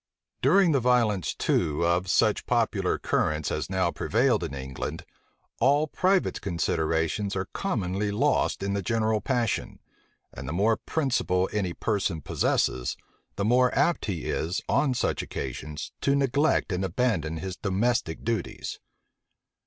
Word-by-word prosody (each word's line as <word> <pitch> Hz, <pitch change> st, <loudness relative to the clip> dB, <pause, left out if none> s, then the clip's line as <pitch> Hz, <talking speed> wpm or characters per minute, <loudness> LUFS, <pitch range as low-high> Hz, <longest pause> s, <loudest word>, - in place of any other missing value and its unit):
During 195 Hz, -4 st, +5 dB
the 140 Hz, -, +3 dB
violence 115 Hz, -7 st, +2 dB
too 75 Hz, +2 st, +1 dB
of 90 Hz, +2 st, +1 dB
such -, -, +2 dB
popular -, -, +1 dB
currents 75 Hz, 0 st, 0 dB
as -, -, -2 dB
now 95 Hz, -2 st, +1 dB
prevailed -, -, +1 dB
in 70 Hz, -, -4 dB
England, 65 Hz, 0 st, -5 dB, 0.5 s
all 145 Hz, +3 st, +4 dB
private 185 Hz, +5 st, +1 dB
considerations 85 Hz, +2 st, -1 dB
are 95 Hz, 0 st, -1 dB
commonly 105 Hz, -, -1 dB
lost 120 Hz, +1 st, +1 dB
in 100 Hz, 0 st, -1 dB
the 100 Hz, -, -1 dB
general 110 Hz, +1 st, 0 dB
passion; 120 Hz, 0 st, -1 dB, 0.6 s
and 70 Hz, -1 st, -7 dB
the -, -, -3 dB
more 105 Hz, +5 st, +2 dB
principle 120 Hz, -, 0 dB
any 95 Hz, -5 st, -1 dB
person 100 Hz, -6 st, -1 dB
possesses, 65 Hz, -2 st, 0 dB, 0.4 s
the 100 Hz, -, -1 dB
more 125 Hz, +3 st, +4 dB
apt 145 Hz, -4 st, +2 dB
is 85 Hz, -1 st, -2 dB
he, -, -, -4 dB
on 130 Hz, +5 st, +2 dB
such -, -, 0 dB
occasions, 75 Hz, +3 st, -6 dB
to 140 Hz, -, +2 dB
neglect 140 Hz, -2 st, +2 dB
and 90 Hz, +1 st, -1 dB
abandon 85 Hz, -5 st, 0 dB
his 95 Hz, +2 st, -5 dB
domestic 100 Hz, -3 st, -1 dB
duties. 115 Hz, -1 st, -3 dB
100 Hz, 135 wpm, -27 LUFS, 85-125 Hz, 0.6 s, During